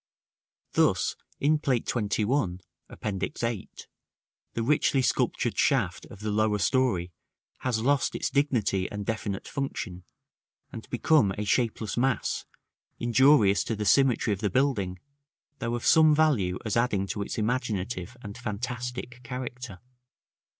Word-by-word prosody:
Thus, - - +2 0.2
in 150 +2 +3
Plate 130 -6 0
XXI. 105 -2 0 0.3
(Appendix 100 +1 -4
8), 115 -4 -4 0.7
the 115 - -1
richly 135 0 +2
sculptured - - 0
shaft - - +1
of 100 - -12
the 105 0 -2
lower 105 0 +2
story 95 -3 +1 0.5
has 115 -3 -1
lost 140 +1 +2
its - - -2
dignity 120 -10 +1
and 105 -1 -5
definite 105 -3 -3
function, 110 -10 -4 0.7
and 115 - -9
become 120 -4 +3
a 105 - -2
shapeless 110 -1 0
mass, 125 -1 0 0.5
injurious 120 -4 +4
to 115 - -2
the 105 0 -3
symmetry 125 -2 +3
of 95 - -5
the 105 - 0
building, 100 -6 0 0.6
though 115 0 -2
of 120 - -5
some 155 -2 +6
value 125 -13 +2
as 110 - -1
adding 115 -5 +1
to 100 +1 -4
its 100 - -4
imaginative 110 -2 -2
and 100 +4 -8
fantastic 125 +2 -5
character. 125 -4 -6
115 Hz, 130 wpm, -27 LUFS, 100-130 Hz, 0.7 s, some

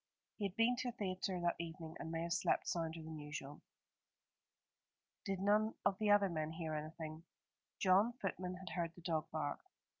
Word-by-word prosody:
He 205 - 0
had 195 -1 -2
been 230 +3 +4
to 250 - -1
a - - -5
theatre 185 -2 -1
that 175 0 +2
evening, 165 -1 -5
and 160 - -4
may 165 0 -1
have 170 0 0
slept - - +2
sounder 165 -1 -1
than 160 -1 -6
usual. 150 -1 -6 1.6
"Did 195 -2 -1
none 210 +3 +3
of 195 - +3
the 215 -1 +2
other 205 -1 +7
men 155 -3 -1
hear 160 -2 -3
anything?" 155 +1 -5 0.5
John, 195 +5 +5
footman, 185 -5 -3
had 185 -1 -7
heard 170 -2 -1
the 175 - -12
dog 160 -2 0
bark. 155 -2 -1
170 Hz, 180 wpm, -39 LUFS, 160-195 Hz, 1.6 s, other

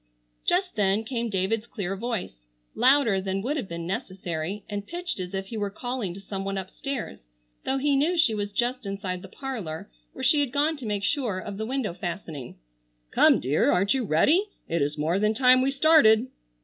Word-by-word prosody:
Just 360 +1 +2
then 205 +1 +2
came 235 0 -2
David's 210 +3 0
clear 195 -6 -3
voice, 195 - -5 0.3
louder 255 -7 +4
than 195 0 -2
would 280 +5 -1
have 260 -10 -3
been 170 -1 -5
necessary, 185 -2 -4
and 205 -1 -5
pitched 350 - -4
as 180 +1 -4
if 195 0 -4
he 230 - -5
were 205 -1 -1
calling 245 -1 -3
to - - -8
some 195 0 -5
one 195 0 -2
upstairs, 195 - -5 0.5
though 265 - +1
he 280 +1 +2
knew 320 +6 +2
she 285 -9 +4
was 205 -1 -2
just 245 +1 -1
inside 195 -2 -3
the - - -9
parlor 205 - -6 0.2
where - - -7
she 300 - +5
had 285 -4 +1
gone 295 +4 +2
to 250 -5 -6
make 205 -1 -1
sure 245 -7 0
of 195 +1 -6
the 220 +1 -3
window 255 -7 -1
fastening. 170 - -6 0.5
"Come, - - +5
dear! 135 +5 +2
Aren't 195 +3 +3
you 265 -2 0
ready? 290 - +3 0.2
It 170 -1 0
is 145 +2 0
more 160 +5 +1
than 215 +1 +2
time 255 +1 +6
we 265 - +2
started." 275 -5 +5
210 Hz, 200 wpm, -26 LUFS, 190-260 Hz, 0.5 s, time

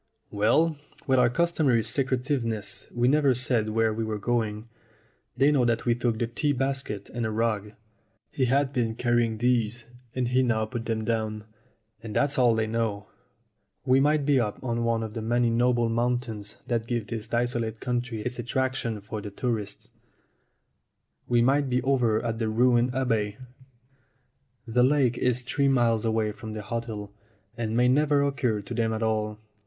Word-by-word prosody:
"Well, 145 +10 +2 0.3
with 130 -1 +3
our 125 -1 +5
customary 145 -5 +2
secretiveness 125 -5 -1
we 120 0 +1
never 140 -1 +3
said 120 -3 +2
where 110 0 +1
we 115 +1 -2
were 110 -1 -2
going. 110 0 -2 0.7
They 140 +3 +4
know 140 -4 +3
that 120 -1 0
we 120 - +3
took 120 -1 -1
the 120 - 0
tea 145 +5 -1
basket 135 -6 -3
and 120 - -3
a 110 - 0
rug." 110 -2 -1 0.6
He 130 - 0
had 135 +2 +1
been 115 -3 0
carrying 120 -2 +1
these, 120 -1 0 0.3
and 125 -2 0
he 130 +1 +3
now 115 -3 +1
put 115 +1 -5
them 110 -1 -1
down. 110 -2 -2 0.6
"And 110 -2 -7
that's 145 -1 +1
all 120 -3 +4
they 110 0 +1
know. 110 -2 -2 0.8
We 130 +1 +4
might 145 +1 +2
be 140 -2 +3
up 105 -1 -3
one 115 -2 0
of 110 -1 -6
the 115 - -4
many 120 +1 +1
noble 120 0 +2
mountains 115 -2 -2
that 115 -2 -2
give 120 -3 -2
this 115 -1 -5
desolate 120 -1 -1
country 120 -2 -2
its 125 +2 -4
attraction 120 -2 -2
for 105 +1 -6
the 105 - -6
tourist. 105 -1 -4 1.4
We 120 -1 +3
might 140 +2 +2
be 125 0 +2
over 120 -5 +1
at 115 -1 -2
the 110 -2 0
ruined 120 +2 +2
abbey. 110 -6 0 1.3
The 120 +1 +1
lake 130 -3 +2
is 125 0 +1
three 140 +2 0
miles 120 -4 +2
away 110 -1 +1
from 110 -1 -8
the 105 -1 -6
hotel, 110 -3 -5 0.4
and 115 -1 -2
may 125 0 +4
never 145 +2 +3
occur 130 -7 0
to 100 +4 -8
them 115 -1 0
at 110 +1 -2
all. 105 -1 -1
120 Hz, 170 wpm, -26 LUFS, 110-125 Hz, 1.4 s, our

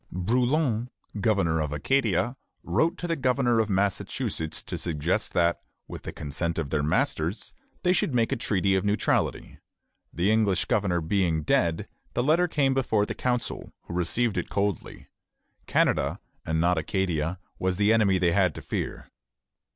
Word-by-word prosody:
Brouillan, 120 - +1 0.3
governor 95 -7 +2
of 75 -1 -2
Acadia, 115 - +1 0.3
wrote 165 +1 +1
to 175 - -4
the 165 - 0
governor 125 -4 +2
of 110 -1 +1
Massachusetts 95 -5 -1
to - - -5
suggest 75 -4 -1
that, 85 0 +2 0.3
with - - -8
the - - -6
consent 80 +3 -3
of 75 -4 -3
their 75 - +1
masters, 80 +5 -1 0.3
they 180 0 +4
should 175 - +1
make 115 -3 +1
a - - +2
treaty 100 -5 +1
of 95 -1 +1
neutrality. 105 0 0 0.5
The 90 +5 +1
English 110 -4 +2
governor 95 -5 +1
being 80 -2 +1
dead, 80 +2 +1 0.3
the 120 - +1
letter 165 +6 +3
came 140 -4 +2
before 110 -6 +1
the - - -4
council, 125 -2 -2
who - - -8
received 100 +6 0
it - - -5
coldly. 100 -2 -2 0.6
Canada, - - +1 0.3
and 80 0 0
not 85 0 +3
Acadia, 85 0 -1 0.2
was 95 -1 0
the 105 +2 +4
enemy 105 -4 +3
they 90 -2 +2
had 90 -2 +2
to - - -8
fear. - - -4
100 Hz, 160 wpm, -26 LUFS, 85-120 Hz, 0.6 s, they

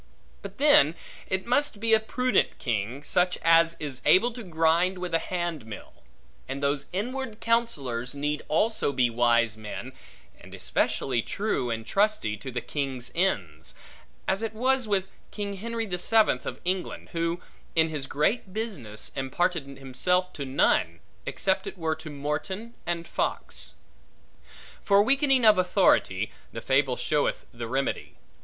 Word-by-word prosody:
But 200 0 -9
then 265 - +5 0.3
it 190 0 0
must 270 -2 +2
be 225 +1 +2
a 220 - +7
prudent 250 +3 +1
king, 120 +3 -2
such 180 +4 +1
as 165 0 +5
is 140 -5 -5
able 235 +6 +5
to 240 - -7
grind 170 0 +2
with 180 -1 -5
a 165 - +4
handmill; 165 - -5 0.6
and 135 +1 -4
those 140 0 0
inward 235 +3 -3
counsellors 140 - 0
had 140 - -8
need 150 0 -1
also 210 0 +1
be 125 -3 +2
wise 120 -1 +3
men, 110 +4 -7 0.5
and - - -12
especially 125 -4 0
true 195 - -2
and 115 -1 -3
trusty 200 - +1
to 105 - -7
the 120 -1 -3
king's 135 -3 -4
ends; 85 - -1 0.5
as 190 +2 +1
it 225 -1 -3
was 255 +1 +1
with 195 -2 +1 0.2
King 200 -1 -5
Henry 230 +2 -3
the 180 -4 -3
Seventh 215 - +3
of - - -5
England, 185 0 -3
who, 170 +1 -1 0.4
in 160 0 +4
his 145 -4 -3
great 185 - 0
business, 185 - -4
imparted 150 +3 -1
himself 140 +8 -1
to 140 - -5
none, 85 - +2 0.3
except 190 +1 0
it 195 -1 -7
were 160 -2 0
to 160 0 -9
Morton 155 +10 -4
and 170 -1 -2
Fox. - - -3 1.1
For 200 0 +5
weakening 270 0 +3
of 215 -3 +7
authority; 175 - +2 0.2
the 115 - -6
fable 135 +1 +2
showeth 150 -1 0
the 115 -1 -5
remedy. 135 +3 -2
165 Hz, 150 wpm, -27 LUFS, 135-205 Hz, 1.1 s, a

